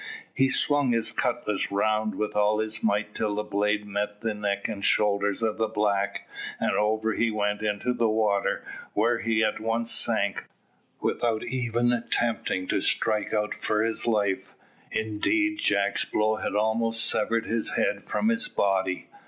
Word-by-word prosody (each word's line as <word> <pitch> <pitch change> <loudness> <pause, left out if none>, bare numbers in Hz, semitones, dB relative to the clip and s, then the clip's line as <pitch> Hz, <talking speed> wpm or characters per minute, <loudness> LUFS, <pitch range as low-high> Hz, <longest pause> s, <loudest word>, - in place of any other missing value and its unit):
He 135 0 +3
swung 145 -2 +3
his 110 -1 +1
cutlass 120 -5 -1
round 110 +2 +1
with 105 -1 -3
all 105 +1 +3
his 110 0 -1
might 105 -1 0
till 105 -2 -1
the 105 - -1
blade 105 0 0
met 105 0 -3
the 115 -1 -1
neck 100 -1 -2
and 105 -3 -5
shoulders 100 +1 +2
of 110 -1 0
the 110 - +2
black, 105 -2 -1 0.3
and - - +1
over 110 +1 +1
he 115 +2 +1
went 105 -1 -1
into 110 +3 -1
the 115 -2 +1
water, 105 -2 +1 0.3
where 120 0 +2
he 115 -1 +1
at 110 - 0
once 115 +1 0
sank, 100 -4 +2 0.6
without 115 -2 0
even 120 -1 0
attempting 115 -5 -1
to - - +1
strike 105 -1 +1
out 105 -1 0
for 105 0 0
his 115 +1 -2
life, 100 -4 0 0.4
indeed 315 - 0
Jack's 100 0 +1
blow 110 0 0
had 100 - -3
almost 115 +2 +1
severed 115 +1 0
his 115 -1 -1
head - - 0
from 220 - 0
his 230 +1 0
body. 95 -2 0
110 Hz, 160 wpm, -26 LUFS, 105-115 Hz, 0.6 s, He